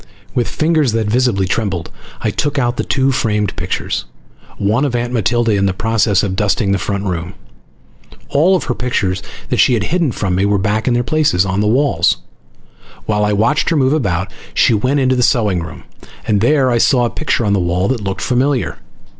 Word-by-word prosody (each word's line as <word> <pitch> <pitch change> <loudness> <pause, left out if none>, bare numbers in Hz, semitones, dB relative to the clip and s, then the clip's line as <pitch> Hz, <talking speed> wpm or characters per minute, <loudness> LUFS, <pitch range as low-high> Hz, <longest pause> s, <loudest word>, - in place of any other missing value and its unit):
With 120 -3 0
fingers 155 -6 +1
that 115 -1 0
visibly 110 -3 +1
trembled 95 -4 -2 0.3
I - - 0
took 145 -1 -2
out 120 -2 0
the - - -1
two 135 0 +1
framed 105 -5 -1
pictures, - - -3 0.5
one 110 +7 +1
of 135 -4 -1
Aunt 120 +1 -2
Matilda 120 +1 +1
in 100 -1 +2
the 95 - -1
process 110 -2 +1
of 95 -2 -2
dusting 100 0 0
the 100 - +1
front 100 +1 -3
room. 90 -2 -4 0.9
All 170 +7 +3
of 180 - -1
her 125 - -2
pictures 100 -7 -1 0.3
that - - 0
she 125 - +4
had 110 - -1
hidden 170 -7 +1
from 100 -4 -2
me 95 +2 +1
were 100 0 +2
back 110 +3 -1
in 120 - +2
their 120 - +1
places 125 -9 +1
on 95 0 -1
the 105 - +1
walls. 110 - +2 0.9
While 105 -1 0
I 105 0 +1
watched 115 +9 +1
her 165 - +1
move 135 0 +2
about, 95 - -1 0.2
she - - +4
went 130 +7 +1
into 130 -1 +2
the 125 - +1
sewing 105 -8 +2
room, 80 - -9 0.4
and 105 -3 +1
there 130 +1 +3
I 120 - +2
saw 125 +1 +3
a - - 0
picture 145 -6 -1
on 100 - +1
the 100 - +2
wall 90 +2 0
that 130 -4 -1
looked 95 -1 -4
familiar. 130 +1 0
115 Hz, 205 wpm, -16 LUFS, 100-130 Hz, 0.9 s, she